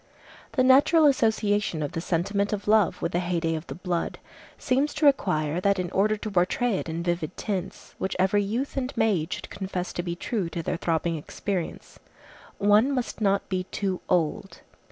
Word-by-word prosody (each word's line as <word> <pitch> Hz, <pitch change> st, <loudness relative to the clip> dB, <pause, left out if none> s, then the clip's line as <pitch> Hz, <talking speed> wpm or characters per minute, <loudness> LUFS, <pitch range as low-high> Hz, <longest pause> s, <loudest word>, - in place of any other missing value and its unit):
The 255 Hz, -, +3 dB
natural 285 Hz, +5 st, +6 dB
association 210 Hz, -, +2 dB
of 145 Hz, -, -3 dB
the 165 Hz, -2 st, -3 dB
sentiment 200 Hz, +4 st, 0 dB
of 205 Hz, -1 st, -4 dB
love 215 Hz, -3 st, +3 dB
with 170 Hz, -, 0 dB
the 175 Hz, -, +1 dB
heyday 175 Hz, -2 st, -1 dB
of 160 Hz, +1 st, -5 dB
the -, -, -6 dB
blood 175 Hz, -1 st, -2 dB, 0.4 s
seems 275 Hz, +3 st, 0 dB
to 305 Hz, 0 st, +1 dB
require 180 Hz, -, +2 dB
that 200 Hz, +1 st, +2 dB
in 180 Hz, -2 st, -3 dB
order 215 Hz, +2 st, +2 dB
to 215 Hz, +1 st, -5 dB
portray 195 Hz, +4 st, +1 dB
it -, -, -6 dB
in 165 Hz, +1 st, -3 dB
vivid 175 Hz, -1 st, -2 dB
tints, 195 Hz, -2 st, -4 dB
which 190 Hz, -, -2 dB
every 190 Hz, +3 st, +3 dB
youth 235 Hz, +8 st, -3 dB
and 260 Hz, 0 st, -1 dB
maid 185 Hz, -7 st, +1 dB
should -, -, -5 dB
confess 190 Hz, -2 st, -4 dB
to -, -, -2 dB
be 170 Hz, -1 st, -4 dB
true 195 Hz, -1 st, -2 dB
to 170 Hz, 0 st, -4 dB
their -, -, -2 dB
throbbing 165 Hz, 0 st, 0 dB
experience, 180 Hz, +3 st, -5 dB, 0.6 s
one 210 Hz, +6 st, +4 dB
must 250 Hz, -4 st, -3 dB
not 200 Hz, -1 st, +1 dB
be 185 Hz, -2 st, -2 dB
too 190 Hz, -1 st, -3 dB
old. 170 Hz, -4 st, 0 dB
195 Hz, 185 wpm, -26 LUFS, 175-215 Hz, 0.6 s, natural